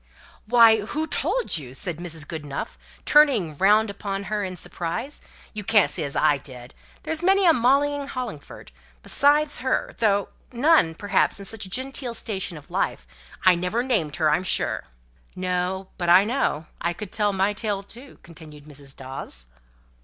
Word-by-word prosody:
"Why, 225 -2 +6
who 305 +9 -2
told 485 - -1
you?" 130 -4 -8
said 175 +1 -4
Mrs. 165 -3 -7
Goodenough, 150 -4 -6 0.3
turning 265 - +4
round 210 +2 +4
upon 200 -1 -5
her 210 -1 0
in 185 -1 -4
surprise. 175 - -4 0.3
"You 210 -1 -5
can't 205 -7 +4
say - - -2
as 140 -1 -4
I 150 -2 +3
did. 125 -2 -10 0.3
There's 320 0 -2
many 385 +2 +4
a 335 - +7
Molly 275 +3 +3
in 285 -1 -5
Hollingford, 245 - -7 0.3
besides 295 +1 +3
her, 260 - -1
though 205 -3 +2 0.2
none, 250 - +3
perhaps, 200 +2 +1
in 200 - -4
such 205 -1 0
a - - -13
genteel 260 +2 -2
station 195 -6 -3
in 150 - -12
life. - - -2 0.4
I 185 - +8
never 180 +7 -1
named 195 - 0
her, 155 -3 +2
I'm 155 +5 +1
sure." 185 - 0 0.5
"No. 185 +1 -2
But 175 -1 -1
I 180 +3 +7
know. 215 - -1 0.2
I 170 +1 0
could 200 +2 -8
tell 210 -1 +1
my 195 +1 +1
tale 205 -2 -3
too," 245 +7 -11
continued 155 -3 -12
Mrs. 140 -2 -9
Dawes. 130 - -4
195 Hz, 170 wpm, -24 LUFS, 165-245 Hz, 0.5 s, I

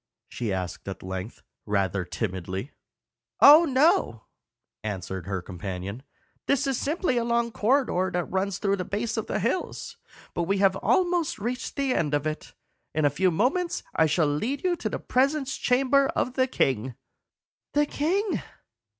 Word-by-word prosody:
she 115 -4 -4
asked 90 -1 -4
at 95 -2 -6
length, 95 +3 -6 0.2
rather 100 -2 0
timidly. 95 - -4 0.7
"Oh 305 +4 +9
no," 275 - +2 0.6
answered 95 -3 -5
her 95 -3 -3
companion. 95 +4 -6 0.5
"This 280 0 +2
is 270 -1 0
simply 300 -3 0
a 235 - +1
long 235 0 +1
corridor 220 -5 +1
that 180 0 0
runs 190 +1 0
through 200 0 0
the 180 - -2
base 215 +5 -2
of 220 - -3
the - - -1
hills, 235 - -2 0.4
but 170 - -1
we 195 +3 +1
have 195 -1 +4
almost 350 - +1
reached 245 +5 -4
the 275 -2 +1
end 150 - +1
of 145 0 -1
it. 155 0 -5 0.4
In 155 -1 +2
a 145 - +4
few 185 +6 +2
moments 265 - 0
I 160 - +4
shall 155 +1 +2
lead 220 - -1
you 365 - +2
into 350 - -2
the - - -3
presence 270 +1 0
chamber 270 +2 +3
of 250 - 0
the 260 0 +2
king." 130 - 0 0.8
"The 295 0 +3
king!" 360 +7 0
200 Hz, 160 wpm, -26 LUFS, -, 0.8 s, Oh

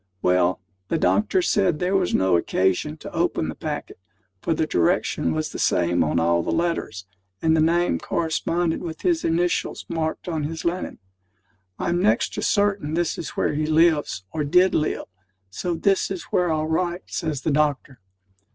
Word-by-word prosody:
Well, 90 0 +2 0.3
the 165 - 0
doctor 220 - +2
said 190 - +2
there 180 +4 0
was 185 -2 +1
no 95 -1 +3
occasion 95 - 0
to - - -10
open 80 - 0
the - - -3
packet, - - -6 0.4
for 165 - 0
the 155 - +1
direction 85 - +1
was 80 0 -2
the - - -6
same 85 0 +2
on 80 +2 +1
all 85 +1 +2
the - - -4
letters, 165 - -2 0.3
and 160 0 +2
the 160 - +3
name 170 +2 +2
corresponded 165 +1 -1
with 160 -3 -6
his 340 -2 +1
initials 175 +2 0
marked 160 +1 -3
on 160 -4 -2
his 160 +1 -5
linen. 175 +2 -2 0.8
"I'm 175 +1 0
next 210 - +2
to - - -3
certain 200 -7 +1
this 175 -1 -1
is 165 - -7
where - - +1
he 155 +1 -1
lives, 155 - +2
or 155 - -2
did 180 +6 +4
live; 155 - 0 0.5
so 175 - -2
this 195 +3 +1
is 190 -3 -4
where 180 -2 +2
I'll 155 0 0
write," 175 +3 -1
says 155 -5 -3
the 160 - +1
doctor. 145 -3 0
160 Hz, 175 wpm, -23 LUFS, 140-175 Hz, 0.8 s, did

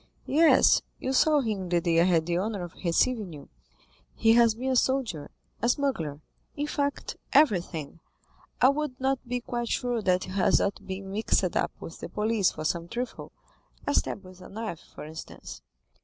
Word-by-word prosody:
"Yes, 300 -2 +5 0.2
you 260 - -2
saw 300 +2 +4
him 205 -7 -3
the 175 0 +3
day 165 -1 +2
I - - +4
had 170 -3 +3
the 175 +1 0
honor 200 -1 -2
of 175 - -8
receiving 195 +2 +1
you; 145 - -11 0.7
he 225 0 +4
has 230 -2 +5
been 260 +3 -2
a - - +1
soldier, 245 - 0 0.3
a 235 - +2
smuggler—in 245 - -3
fact, 285 -1 -2 0.2
everything. 175 - +2 0.6
I 255 - +6
would 280 -2 -2
not 265 0 +1
be 245 0 -2
quite 240 0 -3
sure 245 -2 -1
that 185 -2 +2
he - - -8
has 190 -1 +3
not 200 - -2
been 190 0 -6
mixed 200 -3 +1
up - - +1
with 165 - -9
the - - -7
police 210 +1 +1
for 155 - -7
some 170 +1 -1
trifle—a 250 +4 -7
stab 200 - 0
with 185 0 -14
a - - -11
knife, 215 -5 -5 0.2
for - - -8
instance." 160 - -9
215 Hz, 175 wpm, -27 LUFS, 175-255 Hz, 0.7 s, I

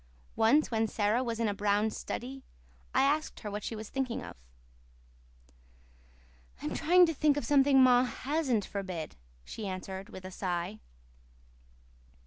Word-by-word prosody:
Once, 250 +8 +3
when 225 -1 +1
Sara 215 +4 +1
was 230 -2 -3
in 230 - +1
a 205 - 0
brown 205 +2 +1
study, 260 +5 -6 0.5
I - - +3
asked 300 +3 0
her 210 - -5
what 205 0 -4
she 225 - -4
was 215 0 -7
thinking 265 -3 -2
of. - - -9 2.2
"I'm 150 - -4
trying 355 +3 +5
to 330 - -1
think 295 -1 +2
of 290 - -2
something 275 -2 +5
ma 250 0 +5
hasn't 260 -5 -1
forbid," 185 - -5 0.3
she 210 - -6
answered 190 0 -6
with 185 0 -10
a 185 - -7
sigh. 185 +2 -3
225 Hz, 145 wpm, -30 LUFS, 200-270 Hz, 2.2 s, trying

